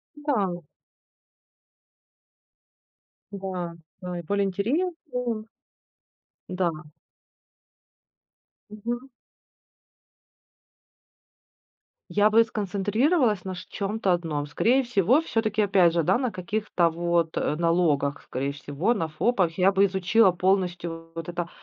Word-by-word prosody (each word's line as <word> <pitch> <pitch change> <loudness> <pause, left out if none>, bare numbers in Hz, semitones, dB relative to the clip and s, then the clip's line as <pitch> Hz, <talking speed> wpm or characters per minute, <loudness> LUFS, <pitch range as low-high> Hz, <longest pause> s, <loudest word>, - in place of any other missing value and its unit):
Да. 205 - -1 2.7
Да, 185 -3 -4 0.3
да, 180 -2 -5
и - - -4
более 200 +4 0
интересным. 245 - -2 1.0
Да. 180 -2 0 2.0
Мгм. 240 +5 -5 3.0
Я 210 +1 +4
бы 225 +2 +6
сконцентрировалась 215 - +1
на 185 - -4
шт 180 - -10
чем-то 200 -1 -1
одном. 160 -4 -1
Скорее 240 - +2
всего, 240 - +3
всё-таки 220 -8 0
опять 185 -4 +4
же, 170 -1 +1
да, 155 - +3
на 250 -3 -1
каких-то 180 -1 0
вот 170 0 0
налогах, 155 -3 +1
скорее 135 +2 -3
всего 145 +9 -1
на 165 -8 -2
ФОПах. 170 +1 0
Я 190 +1 +4
бы 200 0 +4
изучила 190 +2 +3
полностью 175 -2 -1
вот 165 0 -6
это, 175 -1 -3
190 Hz, 95 wpm, -26 LUFS, 170-220 Hz, 3.0 s, бы